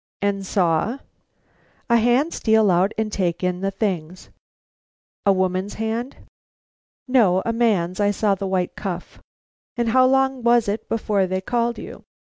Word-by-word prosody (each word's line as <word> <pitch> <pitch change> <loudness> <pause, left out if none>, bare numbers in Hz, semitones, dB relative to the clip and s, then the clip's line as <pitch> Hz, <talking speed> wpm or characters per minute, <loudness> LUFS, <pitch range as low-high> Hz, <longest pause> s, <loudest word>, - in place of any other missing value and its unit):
"And 200 -1 0
saw 185 +5 0 0.5
" - - -38 0.3
"A 235 - +6
hand 245 +8 +2
steal 220 -3 +3
out 180 +3 +2
and 220 -1 -1
take 180 -3 -2
in 180 0 -1
the 195 - 0
things." 185 -4 -4 1.0
"A - - +7
woman's 185 +1 -1
hand?" 225 +4 -3 0.9
"No; 215 -8 +3
a 230 - 0
man's. 200 -6 +1
I 205 0 +3
saw 205 0 +1
the 195 0 -3
white 185 -2 -1
cuff." 180 -3 -6 0.6
"And 235 -1 0
how 255 +2 +5
long 265 0 +1
was 235 -1 +3
it 210 +2 -3
before 210 -4 0
they 185 +1 -1
called 235 +4 -1
you?" - - -9
205 Hz, 155 wpm, -22 LUFS, 185-235 Hz, 1.0 s, A